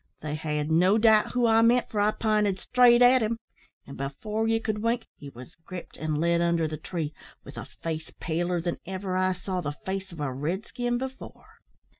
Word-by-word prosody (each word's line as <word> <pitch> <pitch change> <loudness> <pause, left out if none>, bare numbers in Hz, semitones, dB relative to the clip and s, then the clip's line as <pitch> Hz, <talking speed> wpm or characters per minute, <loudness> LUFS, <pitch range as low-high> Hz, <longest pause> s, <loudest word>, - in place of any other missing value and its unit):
They 150 -1 -4
had 150 0 -2
no 180 +6 +4
doubt 220 -1 +4
who 245 -1 +2
I 225 0 +5
meant, 240 +2 +3
for 210 - -1
I 205 - +4
pinted 210 -3 +1
straight 245 +3 +5
at 250 +1 +6
him; 225 +1 0 0.5
and, 140 - -10
before 210 +11 -3
ye 225 0 +2
could 215 -2 -3
wink, 230 +1 0
he 145 - -10
was 130 +3 -12
gripped, 180 0 -9
and 155 -1 -2
led 170 +2 +2
under 170 -2 +2
the 155 - -4
tree, 155 -2 -4 0.3
with - - -11
a - - -6
face 160 -1 -6
paler 175 +2 -1
than 170 0 -3
ever 190 0 -3
I 185 0 +2
saw 185 0 -4
the 145 -3 -3
face 190 -1 -4
o' 160 -3 -6
a 135 -3 -2
red 165 - -3
skin 245 -1 -2
before. 265 +1 -9
185 Hz, 205 wpm, -27 LUFS, 160-225 Hz, 0.5 s, at